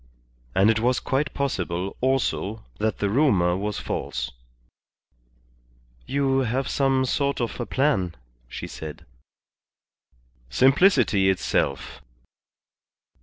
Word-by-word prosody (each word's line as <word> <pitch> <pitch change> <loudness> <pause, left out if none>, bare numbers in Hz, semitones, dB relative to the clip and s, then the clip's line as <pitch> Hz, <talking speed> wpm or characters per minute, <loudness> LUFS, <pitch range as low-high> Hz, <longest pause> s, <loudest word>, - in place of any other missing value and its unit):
And 100 +4 +5
it 110 - 0
was 125 +2 +2
quite 140 +2 -1
possible, 95 -9 -2
also, 120 -5 0
that 110 0 0
the 100 - 0
rumour 100 - +3
was 105 +2 -3
false. - - -4 1.8
"You 135 -1 +1
have 130 +1 -1
some 135 -1 +2
sort 140 +2 0
of 120 0 -3
a 120 - -3
plan," 130 - +1 0.3
she - - -6
said. 75 -2 -8 1.4
"Simplicity 125 - +4
itself. 70 -8 -1
115 Hz, 100 wpm, -24 LUFS, 95-135 Hz, 1.8 s, And